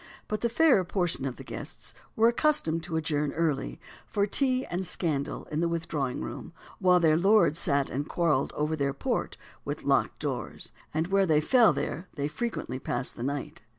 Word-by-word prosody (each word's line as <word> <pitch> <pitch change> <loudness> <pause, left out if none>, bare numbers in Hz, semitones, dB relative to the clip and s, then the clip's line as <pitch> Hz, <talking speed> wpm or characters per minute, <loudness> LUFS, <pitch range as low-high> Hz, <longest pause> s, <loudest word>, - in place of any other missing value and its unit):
But 215 - -2
the 235 - +1
fairer 255 - +4
portion 175 -5 -1
of 130 - -3
the - - -10
guests - - -6 0.2
were 225 +1 +5
accustomed 235 - +2
to 165 -2 -2
adjourn 150 -2 -1
early, 155 -4 -1 0.3
for 200 -2 +1
tea 255 +4 +1
and 180 +2 -3
scandal 155 -6 -2
in 150 - -1
the 170 - +2
withdrawing 155 - -2
room, 65 - -7
the - - -19
while 180 -1 +6
their 160 -2 +4
lords 195 -3 +4
sat 140 -2 +1
and 145 +4 -3
quarrelled 160 -6 +1
over 150 +1 0
their 140 -2 -1
port, - - -2 0.3
with - - -5
locked - - +2
doors; - - -4 0.2
and 160 +3 -1
where 195 0 +3
they 155 -2 +4
fell 235 - +5
there 180 +3 -3
they 145 -2 -1
frequently 150 - -4
passed 125 0 -2
the - - -8
night. 145 +5 -4
165 Hz, 185 wpm, -28 LUFS, 145-195 Hz, 0.3 s, while